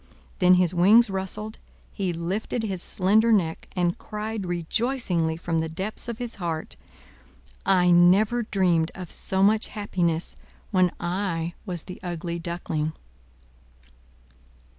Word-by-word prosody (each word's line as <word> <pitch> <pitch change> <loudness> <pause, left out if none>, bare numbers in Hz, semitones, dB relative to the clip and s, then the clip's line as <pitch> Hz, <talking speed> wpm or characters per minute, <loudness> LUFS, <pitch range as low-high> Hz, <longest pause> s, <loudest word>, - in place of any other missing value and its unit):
Then 180 -1 +6
his 180 -1 +3
wings 200 +5 +5
rustled, 210 +3 -4 0.3
he 190 -4 -1
lifted 185 +7 -3
his 190 -5 -2
slender 215 +6 +3
neck, 170 -7 +1
and 175 -1 0
cried 215 -2 -5
rejoicingly 175 -2 -1
from 165 -1 -1
the 160 0 -2
depths 190 +9 -5
of 235 -2 -4
his 240 -2 -3
heart: 165 -2 -3 0.9
"I 180 -2 +4
never 195 +7 +5
dreamed 180 -6 +1
of 180 -3 -8
so 190 0 0
much 215 +2 +3
happiness 175 -5 -2 0.4
when 185 -3 +4
I 175 -2 -2
was 175 -3 -4
the 185 - -9
Ugly 170 -1 -4
Duckling!" 165 -2 -3
180 Hz, 125 wpm, -25 LUFS, 170-210 Hz, 0.9 s, Then